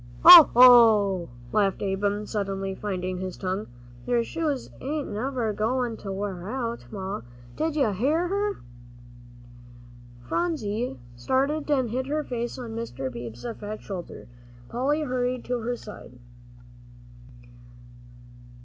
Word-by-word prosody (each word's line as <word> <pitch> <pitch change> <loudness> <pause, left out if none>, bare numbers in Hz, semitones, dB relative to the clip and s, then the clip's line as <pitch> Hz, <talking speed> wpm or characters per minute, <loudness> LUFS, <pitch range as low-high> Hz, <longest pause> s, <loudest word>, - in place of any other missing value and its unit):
"Hoh, 345 -4 +12
hoh!" 220 -7 +6 0.2
laughed 200 -2 +1
Ab'm, 200 +1 -1
suddenly 195 -2 -3
finding 185 -2 -4
his 185 -1 -5
tongue, 190 +2 -3 0.4
"your 240 -1 +2
shoes 300 -1 -3
ain't 295 +2 -3
never 235 0 -2
goin' 235 +3 -1
to 195 - -7
wear 190 -1 -5
out! 235 -2 -4
Ma, 195 - -5 0.3
did 315 0 -2
you 270 -8 +2
hear 290 - 0
her?" 405 +2 -2 1.6
Phronsie 230 - -2 0.2
started 275 - -1
and 260 -6 +1
hid 260 +2 -2
her 300 +2 -1
face 240 -3 -4
on 240 -3 -7
Mr. 135 - -5
Beebe's 120 0 -8
fat 210 +1 -6
shoulder. 185 -4 -8 0.4
Polly 285 +5 0
hurried 250 -3 -2
to 245 0 -2
her 240 +2 -2
side. 210 - -12
230 Hz, 120 wpm, -25 LUFS, 195-265 Hz, 1.6 s, Hoh